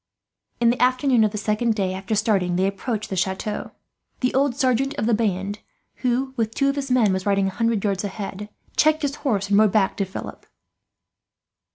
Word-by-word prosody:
In 235 0 +4
the 245 - -3
afternoon 255 -1 +3
of 215 - +3
the 210 - -5
second 215 +2 0
day 190 -3 -1
after 195 +4 -3
starting, 200 -4 +1
they 185 +2 +2
approached 210 +3 -3
the - - -1
chateau. 190 +3 -2 0.5
The 250 - +1
old 270 -1 +2
sergeant 270 0 +1
of - - -2
the 235 - +2
band 205 -2 -1 0.4
who, 255 +1 -1
with 225 -2 -2
two 275 0 +2
of 275 - -1
his 275 -1 -3
men, 235 -6 +3
was 190 +1 -3
riding 200 -1 +2
a - - +1
hundred 230 0 0
yards 200 -2 0
ahead, 205 0 -5 0.3
checked 310 0 +3
his 285 0 -1
horse 205 -8 -1
and 200 - +5
rode 215 -2 +5
back 200 -3 +2
to 195 - 0
Philip. 190 - -8
215 Hz, 200 wpm, -23 LUFS, 195-250 Hz, 0.5 s, and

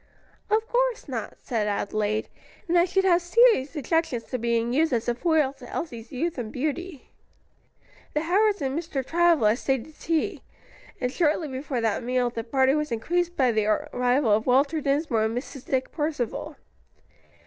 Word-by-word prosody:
"Of 435 +2 +1
course - - 0
not," - - -5
said 220 -4 -1
Adelaide; 210 +1 -1 0.4
"and 345 - +1
I 345 0 +6
should 385 +1 +1
have 360 -2 +4
serious 350 - +4
objections 295 -5 0
to 255 - -1
being 235 +1 0
used 315 +3 +2
as 230 -2 0
a 240 - +2
foil 305 -1 +1
to 245 - -11
Elsie's 235 -7 -6
youth 315 +3 -2
and 220 -3 -5
beauty." 305 +3 -4 1.0
The 300 - +2
Howards 400 +2 +2
and 270 0 -1
Mr. 305 -5 -3
Travilla 330 -11 +3
stayed 265 -1 -1
to 315 - -15
tea, 320 0 -2 0.6
and 250 -1 -1
shortly 315 +1 +1
before 265 -1 -3
that 225 0 0
meal 250 0 0
the 230 -1 -4
party 265 +2 +2
was 300 -2 -1
increased 350 +10 -1
by 255 -3 +3
the 215 -2 +1
arrival 245 +3 +1
of 215 +3 +2
Walter 280 +5 +3
Dinsmore 275 -5 +1
and 225 +2 -2
Mrs. 260 +1 -7
Dick 260 -1 -1
Percival. 295 -7 -3
275 Hz, 170 wpm, -25 LUFS, 240-330 Hz, 1.0 s, I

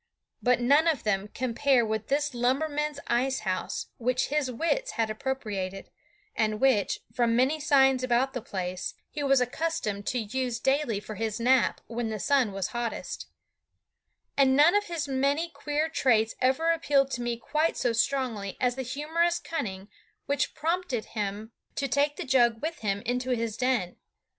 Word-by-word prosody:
But 250 -1 +3
none 285 +7 +4
of 320 -4 +1
them 205 -1 0
compare 255 +2 +1
with 220 -1 -2
this 290 0 0
lumberman's 290 +4 0
ice 260 +2 0
house 185 -3 -2
which 250 +2 0
his 290 -2 0
wits 335 - -1
had 225 -1 0
appropriated, 210 -6 -4 0.4
and 215 -1 0
which, 255 -6 +2
from 235 -2 +2
many 265 +6 +2
signs 270 -4 +4
about 255 +2 +1
the 250 - -3
place, 185 -6 -4 0.2
he 300 - -4
was 275 -2 +4
accustomed 250 -6 -2
to 250 - 0
use 245 +1 -2
daily 265 -6 +1
for 210 +1 -8
his 220 +1 -3
nap 255 +2 +3
when 230 -1 -3
the 215 -1 -4
sun 265 -2 +2
was 195 -2 -3
hottest; 240 -1 -4 1.1
and 265 -1 +4
none 300 +5 +6
of 415 0 +2
his 335 -5 -3
many 280 +5 +1
queer 295 +1 -1
traits 230 -8 +2
ever 265 +6 +3
appealed 280 -4 +2
to 245 - -2
me 240 -1 -2
quite 305 +7 0
so 240 - +1
strongly 235 -5 -1
as 250 -1 +2
the 265 - -3
humorous 320 +7 0
cunning 195 - -4 0.4
which 280 -1 -1
prompted 330 -7 -1
him 210 +1 -3 0.2
to 275 - -1
take 285 +2 +1
the - - -5
jug 240 -3 +3
with 320 +5 -4
him 200 -2 -1
into 250 +2 -2
his 230 -2 -2
den. 245 -8 0
255 Hz, 165 wpm, -28 LUFS, 225-285 Hz, 1.1 s, none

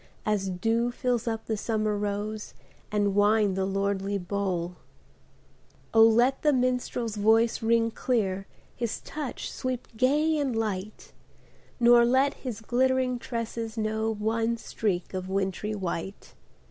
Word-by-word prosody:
As 205 -2 0
dew 225 +6 0
fills 245 -1 -1
up 225 -1 -2
the 220 - -1
summer 215 0 -1
rose 210 +1 -3 0.4
And 205 -1 +1
wine 205 0 +3
the 190 0 0
lordly 195 0 -1
bowl! 180 -2 -2 1.2
let 225 +4 +5
the 300 - +4
minstrePs 250 -3 0
voice 225 +2 +3
ring 230 0 +2
clear. 195 -6 -1 0.3
His 235 -2 -3
touch 300 -5 -5
sweep 255 -1 -4
gay 295 +6 +2
and 270 -5 -1
light; 215 -2 -4 0.7
Nor 240 0 +7
let 260 +4 +3
his 240 -5 -6
glittering 255 +1 +1
tresses 230 -2 -4
know 220 0 0
One 225 +2 0
streak 200 -5 -2
of 185 0 -4
wintry 195 +2 -1
white. 190 0 -5
220 Hz, 125 wpm, -27 LUFS, 200-240 Hz, 1.2 s, Nor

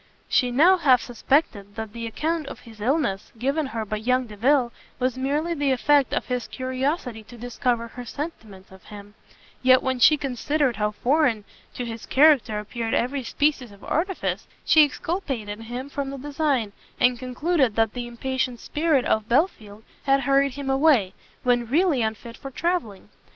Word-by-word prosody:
She 250 -3 +2
now 325 +10 +5
half 265 -7 +5
suspected 235 -5 -1
that 220 -2 -6
the 230 -1 -5
account 315 +6 -2
of - - -8
his 225 -3 -14
illness 245 -5 0
given 275 +5 -1
her 225 -4 -4
by 215 +1 -3
young 250 +4 +1
Delvile, 240 +4 +1 0.3
was 255 -1 0
merely 290 +6 -1
the 285 -3 0
effect 280 +2 +3
of - - -1
his 250 -2 -3
curiosity 255 +1 -3
to 240 - -13
discover 240 0 -2
her 245 +2 -8
sentiments 220 - -8
of 190 0 -16
him; 205 0 -11 0.5
yet 255 0 +5
when 260 -1 -1
she 305 +5 +6
considered 275 0 -1
how 210 0 +1
foreign 245 0 +1 0.3
to 245 - -4
his 230 -1 -7
character 275 -7 +4
appeared 225 +2 -3
every 265 +2 -1
species 270 -1 0
of 200 0 -17
artifice, 360 +4 -2 0.2
she 310 - +7
exculpated 275 - -3
him 240 +4 -6
from 280 -1 -4
the 275 - -6
design, 280 -5 -1 0.3
and 245 -1 +3
concluded 255 -1 0
that 225 -1 +1
the 245 -1 -5
impatient 255 0 -3
spirit 300 -2 0
of 220 0 0
Belfield 220 - 0 0.2
had 275 0 +3
hurried 275 0 +2
him 280 -1 -6
away, 270 -9 +3 0.3
when 245 -1 +2
really 305 0 +2
unfit 220 +1 -4
for 275 - -8
travelling. 305 - -3
255 Hz, 165 wpm, -24 LUFS, 225-285 Hz, 0.5 s, she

